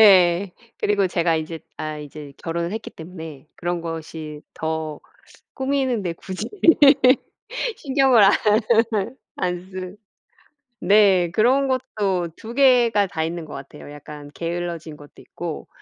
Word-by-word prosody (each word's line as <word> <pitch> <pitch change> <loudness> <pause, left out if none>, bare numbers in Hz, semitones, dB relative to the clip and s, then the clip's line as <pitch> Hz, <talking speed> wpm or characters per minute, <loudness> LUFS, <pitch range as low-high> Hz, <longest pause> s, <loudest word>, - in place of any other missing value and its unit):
예. 185 -2 +6 0.3
그리고 200 -2 +2
제가 170 -1 +1
인제 160 +1 -4 0.2
아 155 -1 -4
이제 150 -1 -9
결혼을 170 +1 -3
했기 220 +1 -5
때문에 160 -4 -10
그런 175 0 -2
것이 160 -2 -7
더 160 -1 -4 0.6
꾸미는데 260 -9 0
굳이 185 +2 -6 1.3
신경을 270 -5 +4
안 195 - +6 1.1
안 180 +1 -3
쓰 185 +1 -7 0.8
네. 195 -4 +4
그런 255 +7 +3
것도 200 -9 -1
2 225 +1 -8
개가 240 -6 +4
다 165 -4 -3
있는 165 0 -4
것 150 - -10
같아요. 140 +2 -10
약간 145 0 -10
게을러진 170 -2 -4
것도 145 0 -15
있고 170 -3 -7
175 Hz, 230 characters per minute, -22 LUFS, 160-205 Hz, 1.3 s, 예